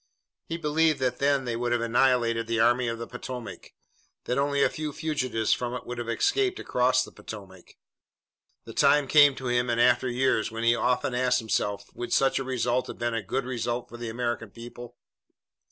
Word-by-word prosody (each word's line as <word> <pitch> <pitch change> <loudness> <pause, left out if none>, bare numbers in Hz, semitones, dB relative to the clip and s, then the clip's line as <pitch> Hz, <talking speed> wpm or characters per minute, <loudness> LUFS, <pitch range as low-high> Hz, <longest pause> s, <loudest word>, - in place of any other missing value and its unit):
He 165 - -3
believed 160 -1 +2
that 125 -1 0
then 140 -1 +2
they 120 -1 -2
would 120 +1 -2
have 120 -1 +1
annihilated 115 -1 +2
the 115 -1 0
Army 120 +2 +3
of 115 0 -2
the 115 - -5
Potomac, 125 0 -8 0.5
that 125 - -1
only 140 0 +2
a - - +5
few 155 -1 -4
fugitives 130 -9 0
from 125 0 -3
it 125 - -7
would 125 0 -6
have 120 -1 -4
escaped 400 - +1
across 130 +1 +2
the - - -10
Potomac. 95 -4 -11 0.9
The - - -9
time 145 -2 +4
came 145 -1 +6
to 130 - -8
him 120 0 +1
in 115 - +1
after 120 +2 +3
years 120 -3 +1
when 115 0 -5
he 115 0 +5
often 125 +1 0
asked 125 0 +2
himself 105 -3 -1
would 120 - -6
such 135 0 +3
a - - -2
result 125 -1 -1
have - - -8
been 120 0 -2
a 115 - -1
good 125 +7 -3
result 120 -1 -3
for 120 - -10
the 120 -1 -5
American 120 -1 -3
people. 120 +2 -11
125 Hz, 200 wpm, -27 LUFS, 115-130 Hz, 0.9 s, came